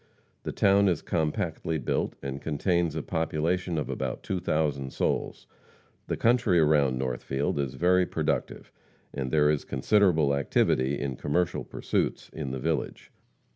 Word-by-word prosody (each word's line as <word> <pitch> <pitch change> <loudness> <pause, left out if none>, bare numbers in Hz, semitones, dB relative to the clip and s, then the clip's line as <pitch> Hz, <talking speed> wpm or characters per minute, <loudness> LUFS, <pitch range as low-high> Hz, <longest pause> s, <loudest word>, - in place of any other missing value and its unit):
The - - -4
town 100 0 +4
is 90 -5 0
compactly 80 0 -1
built, 70 - -1
and 70 0 -4
contains 85 +1 0
a 80 - -3
population 80 +2 -1
of 75 - -2
about - - -4
2,000 75 -7 -1
souls. - - -2 0.6
The - - -2
country 115 -6 +3
around 75 -5 +3
Northfield 65 +3 -2
is 70 -3 -2
very 90 +2 +3
productive, - - -2 0.4
and 65 -2 -3
there 75 +1 +4
is 75 - -1
considerable 80 0 +2
activity 70 0 +1
in 65 -3 -3
commercial 85 +4 0
pursuits - - -2
in 75 -4 -4
the 65 - -3
village. 65 - -3
75 Hz, 135 wpm, -27 LUFS, 70-90 Hz, 0.6 s, town